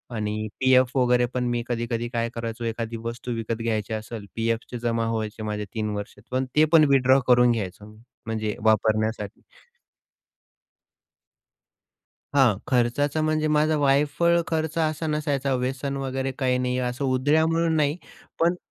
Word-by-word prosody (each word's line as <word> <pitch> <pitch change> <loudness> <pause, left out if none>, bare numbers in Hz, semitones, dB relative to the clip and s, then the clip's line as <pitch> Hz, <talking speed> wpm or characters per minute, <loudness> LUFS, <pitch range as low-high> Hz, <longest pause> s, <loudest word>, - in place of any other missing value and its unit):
आणि 110 0 -2
पीएफ 130 0 +4
वगैरे 125 -1 +3
पण 125 -1 -1
मी 120 -1 -1
कधी 120 -1 -2
कधी 115 +1 -1
काय 115 -1 -1
करायचो, 115 0 -5
एखादी 115 0 -3
वस्तू 120 +1 -5
विकत 115 0 -3
घ्यायची 110 -1 -1
असेल, 110 0 -6
पीएफचे 115 +1 -2
जमा 115 -1 -1
व्हायचे 110 -1 -3
माझे 105 -1 -3
3 110 -1 -2
वर्ष 105 0 -6 0.2
पण 130 +1 0
ते 155 +1 +6
पण 155 -2 +8
विथड्रॉ 135 0 +5
करून 125 -1 +5
घ्यायचो 105 -2 -4 0.4
म्हणजे 110 -2 -2
वापरण्यासाठी. 110 -1 +1 2.9
हां, 125 -8 +4
खर्चाचा 140 +4 +1
म्हणजे 155 0 +1
माझा 155 +1 +2
वायफळ 145 +5 +3
खर्च 160 0 -2
असा 155 0 0
नसायचा 145 -3 -1
व्यसन 130 +2 -2
वगैरे 135 0 -2
काही 125 -2 +2
नाही. 125 0 -1
असं 125 +2 -2
उधळ्या 145 +5 +2
म्हणून 165 0 +1
नाही, 150 0 +1 0.4
पण 170 +2 +3
125 Hz, 145 wpm, -25 LUFS, 115-145 Hz, 2.9 s, पण